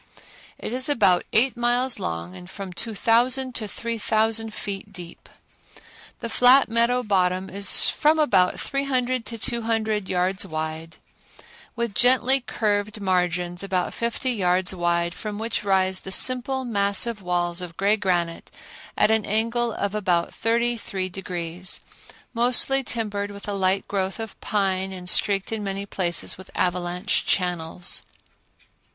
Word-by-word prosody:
It - - -6
is 260 +2 +1
about 200 -10 +3
eight 245 +4 +3
miles 240 +1 +1
long 85 +2 -4
and 90 -1 -11
from 195 -2 -7
2000 235 +6 +1
to 220 -2 -3
3000 225 0 -1
feet 200 -1 -5
deep. 175 -4 -10 0.9
The - - -3
flat 250 +4 +5
meadow 235 +2 +2
bottom 185 -3 0
is 200 +1 +2
from 305 +2 +3
about 195 -12 +3
three 275 0 -2
hundred 255 -3 -1
to 230 - -4
two 235 +2 -1
hundred 220 -3 -1
yards 185 +1 0
wide, 160 +1 -5 0.8
with 235 -3 -2
gently 255 +3 +4
curved 210 -3 -1
margins 180 -2 0
about 190 -2 -1
fifty 235 +2 -1
yards 185 -4 +1
wide 170 -1 0
from 210 +1 -6
which 220 0 -2
rise 190 -1 +2
the 190 - -7
simple 260 +4 +2
massive 205 0 +1
walls 175 -1 0
of 170 -2 -7
gray 200 +2 +3
granite 175 -5 -1 0.5
at 210 - +4
an 220 -1 +2
angle 230 +3 0
of 200 -2 -2
about 180 -5 0
thirty 235 +1 +1
three 190 -3 -3
degrees, 180 -1 -3 0.5
mostly 250 +3 +3
timbered 205 -4 -3
with 200 0 -10
a 205 - -2
light 195 0 +1
growth 195 +1 -2
of 225 -2 -7
pine 190 -2 0
and 180 -1 -8
streaked 195 0 +1
in 220 -2 -2
many 195 0 -3
places 180 -3 -2
with 190 - -11
avalanche 180 +2 0
channels. 175 -1 -1
200 Hz, 145 wpm, -24 LUFS, 180-235 Hz, 0.9 s, flat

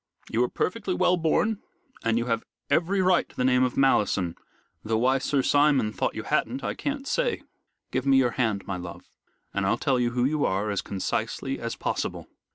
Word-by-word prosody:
You 115 +2 +2
are 125 - 0
perfectly 190 -1 -2
well 180 0 +3
born 180 +6 +1 0.4
and 115 0 +2
you 120 - 0
have 115 -2 -1 0.3
every 180 +6 +2
right 180 -1 +3
to - - -20
the 125 - 0
name 125 0 +4
of 125 - -1
Malleson, 105 -10 +2 0.5
though 110 +1 0
why 130 +4 +3
Sir 135 0 0
Simon 140 -7 +3
thought - - -1
you - - -4
hadn't 130 +4 -1
I - - -1
can't 280 -1 -4
say. - - 0 0.5
Give 130 +1 -1
me 135 -1 +6
your 125 -2 +3
hand, 110 -6 -1
my 95 - -3
love, 90 -1 -8 0.5
and 100 - -1
I'll 95 +5 +2
tell 130 -2 +1
you 120 -1 +2
who 120 +1 0
you 150 +2 +1
are 100 +2 0
as 100 - -1
concisely 95 -2 -3
as - - -4
possible." - - -3
130 Hz, 200 wpm, -26 LUFS, 110-155 Hz, 0.5 s, me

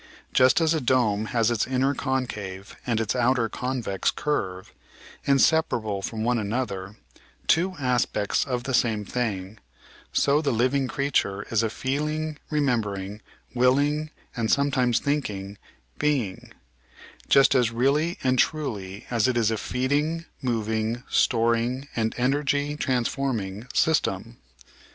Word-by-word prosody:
Just 130 +4 +5
as 165 -1 +3
a 160 - 0
dome 110 -5 +2
has 115 0 +1
its 115 -3 0
inner 130 +2 +1
concave 105 -8 -3
and 115 -2 +1
its 110 0 -1
outer 125 -1 +2
convex 125 -5 -1
curve, 95 -11 -3 0.5
inseparable 135 -8 +2
from 110 +2 -4
one 120 0 +2
another, 105 -3 -3 0.5
two 185 +3 +2
aspects 125 -6 +1
of 125 -2 -3
the 130 - -3
same 110 -4 +1
thing, 105 -3 -3 0.5
so 145 +2 +3
the 145 - 0
living 130 +3 +1
creature 120 -5 0
is 115 -1 +3
a 115 - 0
feeling, 150 +5 -2
remembering, 105 -9 -1 0.3
willing, 145 +5 +2 0.3
and 115 -3 -1
some 140 0 +3
times 125 -3 +2
thinking 105 -9 -2 0.4
being, 130 -11 -1 0.8
just 135 -1 +6
as 125 -3 +3
really 140 +8 +1
and 130 -1 +2
truly 105 -11 -1
as 115 0 +2
it 125 -1 +1
is 115 -2 +2
a 110 - 0
feeding, 145 +9 -1 0.2
moving, 110 -1 -1
storing, 120 +3 +2
and 110 -1 0
energy 145 +3 +1
transforming 120 -6 -2
system. 160 - +1
125 Hz, 130 wpm, -25 LUFS, 110-140 Hz, 0.8 s, just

